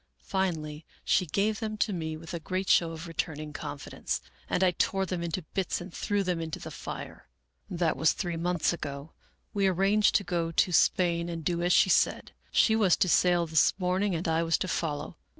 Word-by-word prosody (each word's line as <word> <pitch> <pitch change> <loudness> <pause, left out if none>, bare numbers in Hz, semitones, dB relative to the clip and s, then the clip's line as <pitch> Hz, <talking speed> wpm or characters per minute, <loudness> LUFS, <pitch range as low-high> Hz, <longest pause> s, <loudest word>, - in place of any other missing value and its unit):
Finally 160 -6 -2 0.2
she 180 - +2
gave 210 +7 0
them 215 -2 -4
to 210 -1 0
me 160 -3 -3
with 165 +2 -9
a 170 - -3
great 185 +4 -3
show 170 - +4
of 165 +1 -7
returning 155 -2 -4
confidence, 145 0 -4 0.3
and 185 - +1
I 185 - +5
tore 195 +2 0
them 180 -1 -3
into 170 +1 -3
bits 190 -3 -1
and 175 +2 -9
threw 205 -1 -1
them 180 -3 -1
into 160 -1 -4
the - - -8
fire. - - -8 0.2
" - - -49
That 170 -4 0
was 160 -1 +3
three 175 -3 -3
months 175 0 0
ago. 145 -1 -6 0.4
We 200 -1 +2
arranged 195 +3 +3
to 200 - +3
go 170 -2 -1
to 180 - +2
Spain 170 0 +2
and 165 -2 -5
do 170 -1 0
as 175 +1 +1
she 190 - +5
said. - - +2 0.2
She 220 - +4
was 200 -6 +4
to 190 - +2
sail 175 0 +3
this 160 +2 +3
morning 185 +1 0
and 165 +2 -3
I 165 0 +2
was 165 -1 +2
to - - -3
follow. 155 -4 -3
175 Hz, 205 wpm, -29 LUFS, 165-190 Hz, 0.4 s, I